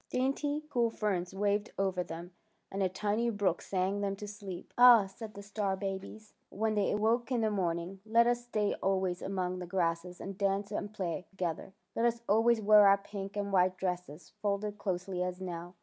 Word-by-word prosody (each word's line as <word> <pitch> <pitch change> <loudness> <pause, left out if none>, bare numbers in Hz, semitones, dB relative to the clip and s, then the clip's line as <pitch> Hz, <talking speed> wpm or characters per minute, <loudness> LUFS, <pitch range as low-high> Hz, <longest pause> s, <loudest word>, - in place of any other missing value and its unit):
Dainty, 285 +3 0
cool 240 -3 +2
ferns 195 -5 -1
waved 205 +2 0
over 190 -2 0
them, 170 +2 -8 0.4
and 195 - -2
a 190 - +2
tiny 210 +5 0
brook 200 -5 0
sang 195 +1 -1
them 200 -1 -1
to 210 +1 -7
sleep. 200 -3 -8
'' - - -50
Ah," 245 -4 +9
said 210 +3 -9
the 200 - -8
star 200 -1 -1
babies, 195 +2 -6 0.2
when 220 +2 -1
they 205 -2 +1
awoke 225 +4 +1
in 245 -2 +2
the 220 -1 +1
morning, 180 -1 -2
" - - -43
let 230 +2 +5
us 240 0 +1
stay 215 -4 0
always 190 -2 0
among 185 -2 -2
the 180 - -6
grasses 175 -1 -1
and 195 0 -7
dance 200 +1 0
and 205 0 -3
play 185 -3 -4
to - - -27
gether. 180 0 -3 0.2
Let 230 - +1
us 235 0 0
always 225 +2 +4
wear 210 0 +8
our 195 0 +7
pink 200 0 -7
and 200 -1 -2
white 185 0 +3
dresses 180 -4 -4
folded 205 0 -1
closely 185 -1 -2
as 180 0 -2
now. 175 -1 -6
200 Hz, 200 wpm, -32 LUFS, 185-215 Hz, 0.4 s, Ah